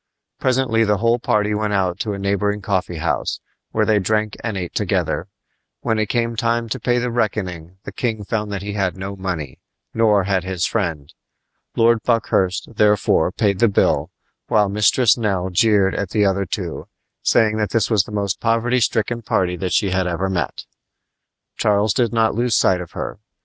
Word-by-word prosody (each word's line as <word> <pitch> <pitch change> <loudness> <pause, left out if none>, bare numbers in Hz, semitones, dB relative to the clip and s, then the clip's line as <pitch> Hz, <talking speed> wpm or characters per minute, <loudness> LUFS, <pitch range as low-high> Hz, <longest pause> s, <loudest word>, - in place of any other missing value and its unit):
Presently 125 -3 +2
the 105 -1 +2
whole 115 +3 +2
party 105 -2 +1
went 105 0 -1
out 95 -2 0
to 105 -3 -2
a - - -4
neighboring 100 +1 0
coffee 95 -3 -2
house, 80 - -1 0.3
where - - +1
they 110 -1 +3
drank 105 +2 0
and 110 -4 -2
ate 90 -2 -5
together. - - -1 0.5
When 110 -2 0
it 110 -1 -1
came 115 -1 0
time 115 +1 0
to 130 - -3
pay 120 +2 +1
the 125 0 -1
reckoning 95 -7 -2
the - - -7
king 110 -4 -2
found 105 0 -3
that 100 -1 -4
he 100 0 -4
had 95 -3 -1
no 95 +1 -5
money, 90 -8 -5 0.3
nor 105 -3 +3
had 95 -2 0
his 95 -2 -2
friend. 80 -10 -2 0.6
Lord 115 0 +3
Buckhurst, 105 -3 0
therefore, 105 -5 +3
paid 100 -2 0
the 115 - +5
bill, 100 - +1 0.4
while 105 -2 +3
Mistress 105 +4 +3
Nell 95 -4 -1
jeered 100 0 +3
at 100 - -3
the 105 0 +2
other 100 -1 0
two, - - -5 0.3
saying 110 -1 +3
that 105 -1 0
this 115 0 0
was 105 -4 +3
the - - -11
most 100 -2 -2
poverty 115 +2 +1
stricken 115 +1 0
party 90 -4 0
that 90 0 -3
she 100 -3 +2
had 95 0 0
ever 90 +2 -1
met. 85 -6 -3 0.9
Charles 105 0 +2
did 120 -4 +1
not 115 -1 +2
lose 120 +1 +1
sight 90 -1 +3
of 85 - -10
her. - - -5
105 Hz, 185 wpm, -20 LUFS, 95-115 Hz, 0.9 s, the